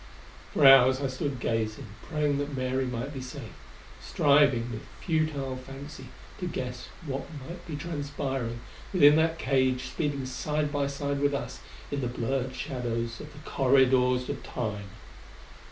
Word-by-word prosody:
For - - +5
hours 130 -1 +8
I 140 - -1
stood 130 0 -2
gazing, 110 -2 -1 0.2
praying 150 -2 0
that 145 -1 -3
Mary 130 0 0
might 125 +4 -4
be 135 - -5
safe, 125 - -8 0.5
striving 140 -5 +3
with 110 -2 -5 0.2
futile 155 -6 -1
fancy 135 +1 -9 0.3
to 180 - -2
guess 125 -7 -4 0.2
what 135 -2 -3 0.2
might 175 +1 -9
be 160 - -4
transpiring 140 -6 -3 0.3
within 150 -6 +7
that 160 +1 +2
cage 130 -3 +1
speeding 145 -4 -1
side 150 +3 -1
by 145 -1 0
side 140 0 -2
with 145 0 +2
us - - -5 0.3
in 140 -1 -1
the 125 - -1
blurred 130 +2 -2
shadows 115 -5 -3
of 150 - -9
the 145 +1 -13
corridors 125 -1 +4
of - - -4
Time. 105 -5 -4
135 Hz, 150 wpm, -28 LUFS, 125-145 Hz, 0.5 s, hours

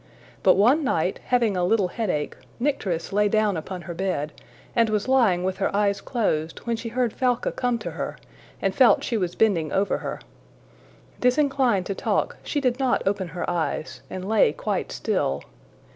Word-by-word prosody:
But 185 - +5
one 250 +10 +4
night, 180 - 0
having 235 -5 +2
a 180 - 0
little 190 0 +2
headache, 180 -9 -2 0.2
Nycteris 195 - -1
lay 210 +1 +3
down 215 -2 +2
upon 175 +2 -5
her 170 - -6
bed, 170 -4 -2 0.4
and 230 -2 +4
was 210 +1 0
lying 230 -10 +3
with 185 0 -1
her - - +1
eyes 200 -1 +1
closed, 165 -10 -1
when 235 -1 -1
she 230 +1 -5
heard 240 -1 0
Falca 250 -2 0
come 245 -2 0
to 215 - -6
her, - - -5 0.5
and - - +1
felt 255 -7 +5
she 235 - -1
was 180 -5 -1
bending 175 -9 +2
over 195 +1 +1
her. - - -5 1.0
Disinclined 250 -6 +2
to 195 - -2
talk, - - -1
she 295 - -2
did 255 -2 0
not 260 -2 +1
open 195 -1 0
her 175 +1 -5
eyes, 170 -2 -2
and 185 0 -5
lay 225 - +4
quite - - -2
still. - - -1
210 Hz, 175 wpm, -24 LUFS, 180-245 Hz, 1.0 s, But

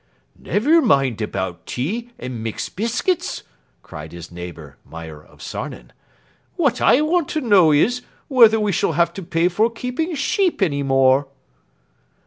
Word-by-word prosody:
"Never 300 +11 +2
mind 135 - +2
about 95 -4 -4
tea 215 - -3
and 125 -3 -6
mixed 110 -1 -5
biscuits!" 235 - -1 0.4
cried 75 +1 -10
his 85 -1 -10
neighbour, 85 -5 -9
Meier 80 -2 -10
of - - -17
Sarnen. - - -7 0.6
"What - - +1
I 265 - +5
want 330 +1 +1
to 310 - -1
know 200 - +5
is 235 +12 +2 0.3
whether 230 -5 +6
we 210 -1 0
shall 170 - 0
have 170 0 +1
to 195 - -7
pay 165 0 0
for 210 +6 +1
keeping 250 +8 -3
sheep 330 - 0
any 145 -6 0
more." 135 0 +3
170 Hz, 145 wpm, -20 LUFS, -, 0.6 s, whether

